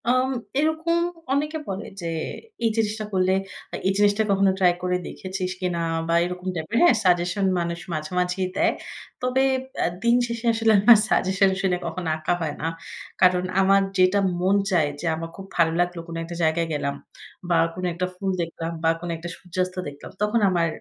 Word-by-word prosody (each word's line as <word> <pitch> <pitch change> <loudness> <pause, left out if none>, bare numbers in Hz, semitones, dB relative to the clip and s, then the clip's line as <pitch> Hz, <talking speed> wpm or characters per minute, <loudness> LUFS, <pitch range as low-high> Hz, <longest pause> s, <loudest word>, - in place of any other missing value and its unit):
আম 255 +1 +3 0.3
এরকম 315 +2 +1 0.4
অনেকে 300 +3 0
বলে, 195 +2 -4 0.2
যে, - - -6 0.6
এই - - +4
জিনিসটা 215 -1 0
করলে, 185 0 +2 0.4
আ - - -1
এই - - +4
জিনিসটা 205 +1 +3
কখনো 195 0 +4
ট্রাই 180 -2 +5
করে 180 0 +1
দেখেছিস 185 -1 -4
কিনা? 180 -2 -1 0.3
বা 165 - +1
এরকম 180 +1 -6
টাইপের 165 +8 -2
হ্যাঁ, 345 -8 +6
সাজেশন 180 +2 +2
মানুষ 170 0 -2
মাঝে, 155 +1 -4
মাঝেই 180 +1 0
দেয়। - - +3 0.5
তবে 255 +1 +2 0.3
অ্যা - - +1 0.2
দিন 235 0 +4
শেষে 235 0 -5
আসলে 225 0 +2
আমার 225 +3 +8
সাজেশন 195 +1 +3
শুনে 185 -2 +1
কখনো 180 -3 -3
আঁকা 160 +3 0
হয় 155 -2 -2
না। 160 - -1 0.5
কারণ 180 -1 +5 0.2
আমার 195 +1 +5 0.2
যেটা 185 +2 +4 0.2
মন 190 +2 +3
চায় 165 -6 +2
যে, - - -6
আমার 165 +1 -5
খুব 195 - -9
ভালো 165 -2 +4
লাগলো 175 0 0
কোন 165 - -7
একটা 170 +1 -7
জায়গায় 165 +1 +2
গেলাম 140 -1 -2 0.5
বা 170 - +4 0.2
কোন 185 +2 -7
একটা 175 +2 -1
ফুল 195 +1 -2
দেখলাম 165 0 -4
বা 165 - +4
কোন 175 +1 -6
একটা 170 +2 -7
সূর্যাস্ত 185 0 -3
দেখলাম 145 0 -9
তখন 210 +3 +2
আমার 170 -2 +2
185 Hz, 180 wpm, -24 LUFS, 170-205 Hz, 0.6 s, আমার